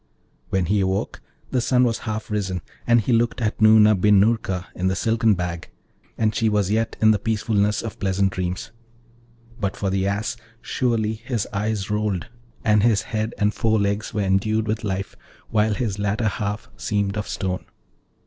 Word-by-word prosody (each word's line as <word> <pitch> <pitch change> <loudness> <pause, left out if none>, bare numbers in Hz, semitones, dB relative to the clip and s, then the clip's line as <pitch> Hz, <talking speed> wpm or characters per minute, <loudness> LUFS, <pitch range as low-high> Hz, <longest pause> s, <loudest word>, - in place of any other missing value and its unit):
When 95 -2 +1
he 100 +5 +1
awoke 95 0 -1 0.3
the 125 - +1
sun 125 +1 +3
was 115 -2 +1
half 110 0 -4
risen, 95 -5 -2 0.2
and 120 -1 +5
he 120 - 0
looked 115 +2 +1
at 110 -3 -1
Noorna 110 0 +7
bin 105 +1 +4
Noorka 100 -4 +1
in 90 - -1
the 95 - +1
silken 115 -1 +2
bag, 90 -2 -4 0.5
and 110 -1 +1
she 110 0 +1
was 105 -2 +1
yet 115 +1 0
in 110 0 +6
the 105 - +2
peacefulness 105 -1 0
of 115 - -6
pleasant 95 0 +1
dreams; 90 +3 -4 0.9
but 100 -3 -2
for 100 -2 -1
the 95 0 0
Ass, 100 +4 -2 0.2
surely 115 -4 0
his 115 -1 -3
eyes 105 0 -2
rolled, 105 -4 -1 0.4
and 105 -1 +4
his 110 -2 +3
head 110 +1 -3
and 105 +1 +1
fore 110 -1 +1
legs 100 +1 -1
were 105 - -1
endued 105 +3 +1
with 110 +1 -2
life, 100 -1 -3 0.4
while 105 -1 +2
his 105 -2 -2
latter 105 +2 0
half 105 +1 -4
seemed 100 -2 -1
of 105 -1 -3
stone. 95 -2 -3
105 Hz, 175 wpm, -23 LUFS, 100-110 Hz, 0.9 s, Noorna